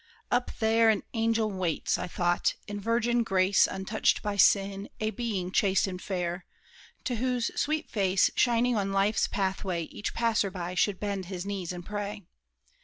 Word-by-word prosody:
"Up 245 0 +1
there 225 0 +4
an 215 -2 +2
angel 225 -1 +1
waits," 185 -4 -1
I - - -3
thought, 175 0 0
"in 205 0 -5
virgin 235 +3 +1
grace, 195 -3 +3
Untouched 195 +3 0
by 205 -1 -2
sin—a 200 +2 +2
being 210 -7 -3
chaste 195 -1 +3
and 185 -2 -5
fair, 180 -1 -3 0.6
To 245 -3 -2
whose 250 0 0
sweet 310 +1 -1
face 195 -3 +2
shining 245 0 +3
on 195 -2 0
life's 195 +2 +2
pathway 190 -3 -2
Each 200 - -6
passer 230 -4 +1
by 180 -2 -5
should 185 +1 +1
bend 200 -2 -3
his 180 0 -6
knees 195 -4 -3
and 175 -1 -7
pray. 205 0 -5
200 Hz, 160 wpm, -28 LUFS, 185-225 Hz, 0.6 s, there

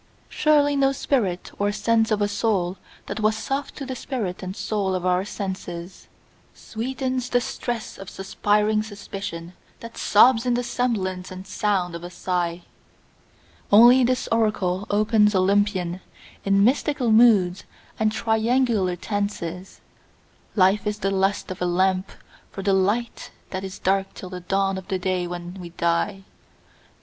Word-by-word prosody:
Surely 290 -2 +3
no 275 -1 +3
spirit 220 -10 -1
or 205 0 +1
sense 225 +2 +1
of 210 -2 +1
a - - +2
soul 205 -4 0 0.3
that - - -5
was 215 0 +2
soft 275 +5 -3
to 275 - -6
the 260 0 -5
spirit 225 -10 -4
and 185 0 -5
soul 200 -4 -1
of 180 -1 -3
our 180 0 +2
senses 190 -3 -6 0.5
Sweetens 255 +2 -3
the 245 - +3
stress 240 -2 -5
of 195 - -8
suspiring 210 +2 +1
suspicion 195 -5 -7 0.3
that 230 0 -10
sobs 225 +2 +5
in 245 -1 +1
the 245 - -1
semblance 200 -7 -2
and 185 0 -9
sound 190 -2 -1
of 170 0 -7
a 175 - -6
sigh; 175 -1 -2 1.1
Only 240 +5 +8
this 255 +1 0
oracle 210 -4 0
opens 210 0 +3
Olympian, 185 -2 +1 0.4
in 195 0 +3
mystical 260 0 +2
moods 210 -6 +4 0.3
and 215 -1 +2
triangular 220 -3 +1
tenses 190 -2 -4 0.7
"Life 200 +1 +3
is 210 0 -1
the 195 -1 -1
lust 195 0 0
of 185 - -7
a 180 - +1
lamp 185 +1 +1 0.4
for 195 - -7
the 200 0 +2
light 205 +5 0 0.2
that 190 0 -4
is 190 0 -6
dark 195 +1 0
till 185 - -8
the 180 - -5
dawn 195 +1 0
of 190 - -14
the 190 - -1
day 185 -1 -1
when 175 0 -6
we 175 - -8
die." 170 +3 -1
200 Hz, 150 wpm, -23 LUFS, 185-225 Hz, 1.1 s, Only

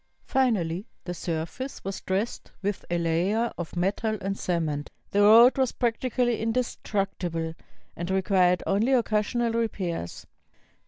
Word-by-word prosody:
Finally, 210 -8 +1 0.2
the 175 - -4
surface 170 +10 -4
was 195 0 -4
dressed 195 +5 -2
with 205 0 -2
a 175 - +1
layer 180 +8 +1
of 175 0 -6
metal 205 +5 0
and 195 +1 -2
cement. 160 -6 -2 0.2
The 205 - +3
road 230 +6 +7
was 260 -2 +2
prac 235 -2 0
tically 245 -2 0
indestructible, 195 -8 -2 0.4
and 170 +1 -4
required 185 -2 +3
only 220 +7 +2
occasional 230 0 +1
re 230 0 +2
pairs. 170 - -5
195 Hz, 130 wpm, -27 LUFS, 175-230 Hz, 0.4 s, road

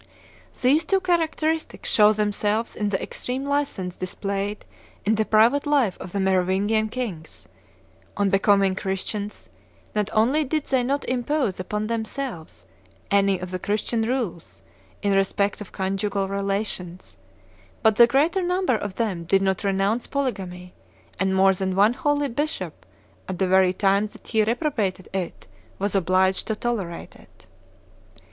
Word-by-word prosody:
These 290 +6 +3
two 390 +4 +2
characteristics 325 -3 -1
show 210 -1 +6
themselves 210 +1 0
in 210 -1 -1
the 190 - 0
extreme 260 +2 -4
license 280 -11 -1
displayed 200 +2 -4 0.4
in 215 - +3
the 220 0 +1
private 235 +8 +4
life 270 -10 +2
of 180 - -8
the 200 - -2
Merovingian 190 +3 +1
kings: 215 -10 -6 0.7
on 200 -1 +2
becoming 195 -1 +4
Christians, 200 +2 -4 0.5
not 210 -1 0
only 250 +8 +3
did 300 +1 -1
they 260 -2 +1
not 275 +3 -1
impose 255 -4 0
upon 210 +3 -2
themselves 230 -4 -5 0.5
any 200 -1 +3
of 180 0 -7
the 185 - -3
Christian 215 +4 -1
rules 220 -8 -3 0.4
in 200 -1 +2
respect 200 +1 +1
of 205 - -9
conjugal 195 +1 -1
relations, 195 -2 -4 0.7
but 220 -2 +4
the 235 - +8
greater 300 +10 +2
number 360 -4 +1
of 205 -3 -4
them 195 -8 -2
did 195 +3 +3
not 190 -1 0
renounce 200 +4 0
polygamy, 185 -10 -3 0.5
and 190 0 +1
more 190 0 +5
than 190 0 -2
one 205 +4 +5
holy 290 +2 0
bishop, 230 - -4 0.4
at 185 - -3
the 190 - +1
very 190 0 +5
time 200 +2 +2
that - - -17
he 220 -2 +2
reprobated 220 - -1
it, 185 -3 -4 0.3
was 200 0 -2
obliged 190 0 +2
to 220 - -1
tolerate 210 -7 -4
it. - - -20
205 Hz, 145 wpm, -24 LUFS, 190-245 Hz, 0.7 s, the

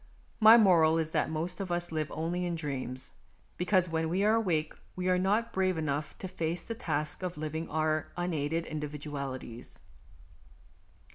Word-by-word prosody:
My 220 +1 +9
moral 170 -7 +5
is 160 -1 -1
that - - +1
most 165 +3 -3
of 190 -3 -4
us 175 0 -1
live 155 -2 -2
only 170 +3 -2
in 175 -1 -1
dreams, 130 -5 -4 0.4
because 180 0 +2
when 160 -1 -1
we 185 +4 +1
are 215 +1 +4
awake 170 -9 +1 0.2
we 185 0 -2
are 180 0 +3
not 205 +5 +1
brave 185 -2 +1
enough 150 -1 -2
to 190 - -5
face 170 -1 -3
the 230 - -4
task 155 -10 -2
of 180 -2 -4
living 155 +1 -3
with - - -8
our 155 -1 0
unaided 165 -2 -1
individualities. 145 -5 -6
165 Hz, 165 wpm, -30 LUFS, 155-180 Hz, 0.4 s, My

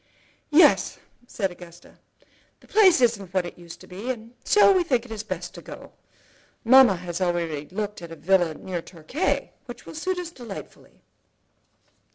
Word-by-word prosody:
"Yes," 310 +4 +5 0.3
said 195 -6 -2
Augusta, 175 -1 -15 0.6
"the - - -21
place 385 -9 +5
isn't 215 -6 +1
what 185 -2 +2
it 175 - -8
used 170 -1 -12
to - - -14
be, 200 +7 -7
and 230 -2 -5
so 415 -1 +5
we 370 -2 +3
think 250 -7 0
it 220 -2 -7
best 180 -2 -5
to - - -10
go. - - -11 0.7
Mamma 255 -3 +7
has 175 0 -6
already 170 -5 -1
looked 205 0 -4
at 170 -1 -9
a - - -7
villa 175 -2 +1
near 180 0 -5
Torquay, 175 - -3 0.2
which 245 -1 -10
will - - -10
suit 360 +4 -2
us 355 -2 -5
delightfully." 235 - -11
200 Hz, 165 wpm, -24 LUFS, 175-255 Hz, 0.7 s, Mamma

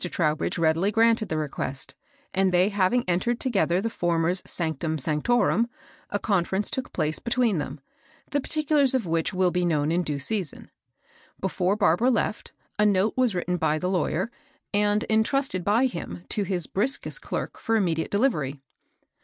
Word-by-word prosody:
Trowbridge 155 -3 0
readily 165 +4 +2
granted 225 0 +3
the 155 - -1
request, 140 -3 -4 0.4
and 190 0 +2
they 180 +3 +3
haiHng 205 +5 +2
entered 230 +7 0
together 195 -8 +1
the 215 - -1
feccs^^ - - -4 0.6
416 175 - -4 0.2
MABEL 160 -1 -1
BOSS. 145 - -2
ionctiim 150 -2 0
$(mdorum^ 235 0 +2 0.4
a 205 - 0
conference 195 0 0
took 260 -1 -3
place 155 0 -1
be 235 - -5
tween 235 -7 +2
them, 145 0 -5 0.5
the 285 0 +1
particulars 295 -3 +2
of 245 -6 0
which 165 -1 0
will 185 -1 +2
be 180 0 0
known 155 -3 +1
in 175 +2 +2
due 150 -4 -2
season. 175 +3 -3 0.7
Before 190 0 0
Barbara 210 +4 +3
left, 230 -3 -1 0.3
a 210 - +5
note 200 +1 +2
was 250 -6 +2
written 180 0 -1
by 155 -2 +1
the 180 +3 -2
lawyer, 185 +3 0 0.4
and 210 +1 +2
entrusted 220 -2 +1
by 215 +7 +3
him 175 -6 -5
to 210 - 0
his 180 -3 +2
brid^est 265 - -2
clerk - - -4
for 225 - 0
immediate 170 -6 0
delivery. 160 - 0
190 Hz, 170 wpm, -25 LUFS, 165-225 Hz, 0.7 s, a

